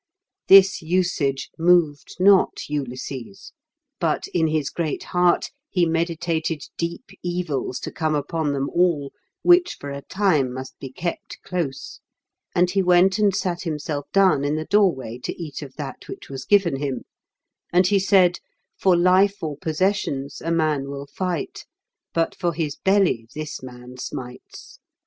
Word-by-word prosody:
This 195 Hz, 0 st, +7 dB
usage 160 Hz, -5 st, 0 dB
moved 165 Hz, -4 st, +2 dB
not 195 Hz, 0 st, +4 dB
Ulysses; 135 Hz, +4 st, -6 dB, 0.5 s
but 165 Hz, -4 st, 0 dB
in 165 Hz, -2 st, +2 dB
his 155 Hz, -2 st, -1 dB
great 160 Hz, -4 st, -3 dB
heart 180 Hz, -1 st, +2 dB, 0.2 s
he 180 Hz, -2 st, +2 dB
meditated 165 Hz, -2 st, -1 dB
deep 170 Hz, +8 st, -5 dB
evils 175 Hz, -8 st, -2 dB
to -, -, -5 dB
come 155 Hz, -2 st, -1 dB
upon 150 Hz, +1 st, -1 dB
them 140 Hz, -1 st, -1 dB
all, 170 Hz, -6 st, +1 dB, 0.3 s
which 355 Hz, 0 st, +5 dB
for 140 Hz, -, -6 dB
a 140 Hz, 0 st, -6 dB
time 160 Hz, -8 st, +1 dB
must 130 Hz, +1 st, -7 dB
be 135 Hz, -, -8 dB
kept 170 Hz, +5 st, -5 dB
close, 165 Hz, -7 st, -4 dB, 0.6 s
and 180 Hz, 0 st, +3 dB
he 195 Hz, 0 st, +2 dB
went 180 Hz, +2 st, +4 dB
and 205 Hz, -3 st, +3 dB
sat 175 Hz, -3 st, -2 dB
himself 150 Hz, -3 st, -4 dB
down 190 Hz, -8 st, +4 dB
in 145 Hz, +1 st, 0 dB
the 155 Hz, 0 st, -3 dB
door 200 Hz, 0 st, +4 dB
way 125 Hz, -5 st, -8 dB
to -, -, -6 dB
eat 155 Hz, -4 st, -6 dB
of 135 Hz, -3 st, -9 dB
that 145 Hz, -3 st, -7 dB
which -, -, -9 dB
was 130 Hz, -1 st, -6 dB
given 195 Hz, -8 st, +3 dB
him; 135 Hz, -1 st, -3 dB, 0.7 s
and 180 Hz, +1 st, +4 dB
he 200 Hz, +2 st, +3 dB
said, 185 Hz, -2 st, +4 dB, 0.4 s
"For 185 Hz, -2 st, +3 dB
life 185 Hz, +3 st, +3 dB
or 155 Hz, -2 st, -3 dB
possessions 155 Hz, -4 st, -1 dB
a 165 Hz, -, -3 dB
man 155 Hz, -4 st, +1 dB
will 140 Hz, 0 st, -6 dB
fight, 170 Hz, +2 st, -4 dB, 0.4 s
but 165 Hz, 0 st, 0 dB
for 175 Hz, -2 st, -1 dB
his 155 Hz, -3 st, -2 dB
belly 190 Hz, -, +2 dB
this 155 Hz, -1 st, -5 dB
man 125 Hz, 0 st, -11 dB
smites. 125 Hz, 0 st, -8 dB
165 Hz, 155 wpm, -23 LUFS, 140-180 Hz, 0.7 s, This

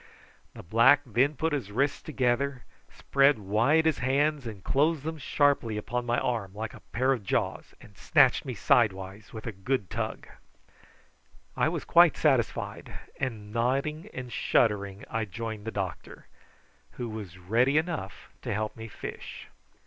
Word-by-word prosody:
The -, -, -9 dB
black 115 Hz, +10 st, +5 dB
then 130 Hz, +5 st, +2 dB
put 160 Hz, +3 st, -1 dB
his 125 Hz, -9 st, -3 dB
wrists 140 Hz, +6 st, 0 dB
together, 130 Hz, -2 st, -1 dB, 0.3 s
spread 140 Hz, +1 st, +3 dB
wide 115 Hz, +11 st, +2 dB
his 160 Hz, -3 st, +2 dB
hands, 140 Hz, +1 st, +1 dB
and 100 Hz, -5 st, -8 dB
closed 150 Hz, +1 st, +1 dB
them 160 Hz, 0 st, -4 dB
sharply 140 Hz, -7 st, +1 dB
upon 120 Hz, +3 st, -3 dB
my 120 Hz, 0 st, +1 dB
arm 105 Hz, -6 st, -2 dB
like 110 Hz, +1 st, -5 dB
a -, -, -11 dB
pair 130 Hz, +3 st, +2 dB
of 120 Hz, -6 st, -5 dB
jaws, 95 Hz, -, -2 dB
and 100 Hz, -, -16 dB
snatched -, -, +4 dB
me -, -, -5 dB
sidewise 100 Hz, -2 st, +1 dB
with 110 Hz, -1 st, -8 dB
a 115 Hz, -, -3 dB
good 100 Hz, 0 st, -2 dB
tug. -, -, -4 dB, 1.3 s
I -, -, +2 dB
was -, -, -4 dB
quite -, -, +6 dB
satisfied, -, -, 0 dB, 0.3 s
and 110 Hz, -5 st, -4 dB
nodding 140 Hz, -, -1 dB
and 125 Hz, -1 st, -7 dB
shuddering 100 Hz, -3 st, +1 dB
I 115 Hz, -1 st, -2 dB
joined 110 Hz, 0 st, -6 dB
the 115 Hz, -, -3 dB
doctor, 95 Hz, -7 st, -5 dB, 0.7 s
who 120 Hz, -, -5 dB
was 105 Hz, -5 st, -7 dB
ready 120 Hz, +10 st, +2 dB
enough 155 Hz, -, -3 dB
to -, -, -4 dB
help 110 Hz, +1 st, -2 dB
me 115 Hz, 0 st, -8 dB
fish. 105 Hz, -, -8 dB
120 Hz, 155 wpm, -28 LUFS, 105-140 Hz, 1.3 s, quite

